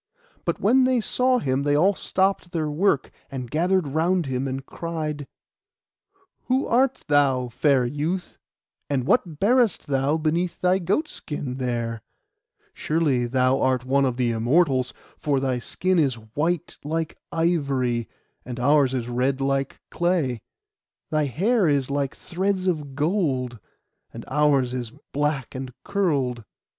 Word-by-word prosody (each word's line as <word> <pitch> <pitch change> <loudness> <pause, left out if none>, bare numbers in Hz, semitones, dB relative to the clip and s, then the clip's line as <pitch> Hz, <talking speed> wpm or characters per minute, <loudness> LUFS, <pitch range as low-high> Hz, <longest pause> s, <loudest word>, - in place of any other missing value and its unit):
But - - -1
when 255 +5 +4
they 255 -1 +3
saw 255 +3 +2
him 135 - 0
they 145 0 +2
all 185 +7 +4
stopped 190 -1 0
their 155 -3 -1
work, 155 -2 +1 0.2
and 125 -3 -6
gathered 175 0 +1
round 170 +4 +1
him, 130 0 -2
and 135 +1 -4
cried— 155 -4 -4 1.2
'Who 260 +2 +1
art 260 +2 +2
thou, 135 -4 +3
fair 135 +1 +2
youth? 155 +8 -3 0.5
and 135 -3 0
what 165 - +1
bearest 235 -1 +3
thou 140 +2 +1
beneath 165 +3 -1
thy 185 +1 +3
goat 200 - 0
skin 145 - -5
there? 120 -3 -2 0.7
Surely 145 -6 +1
thou 130 +1 +2
art 130 -1 +1
one 140 +2 +2
of 125 -2 -1
the 125 -2 +1
Immortals; 130 +3 +2 0.3
for 145 -3 +1
thy 130 -2 0
skin 185 +8 0
is 135 -5 +2
white 145 +10 -2
like 160 +2 -2 0.2
ivory, 140 - 0 0.3
and 125 -1 -6
ours 135 0 +3
is 120 -2 -2
red 130 +3 0
like 135 0 -1
clay. 165 - 0 0.7
Thy 155 -1 +2
hair 195 - +2
is 140 -2 +1
like 140 -1 -1
threads 190 +1 -2
of 150 -7 -2
gold, 145 - 0 0.5
and - - -9
ours 140 -3 +2
is 125 -3 -3 0.2
black 145 -2 -1
and 130 0 -5
curled. 140 - 0
145 Hz, 140 wpm, -24 LUFS, 130-175 Hz, 1.2 s, when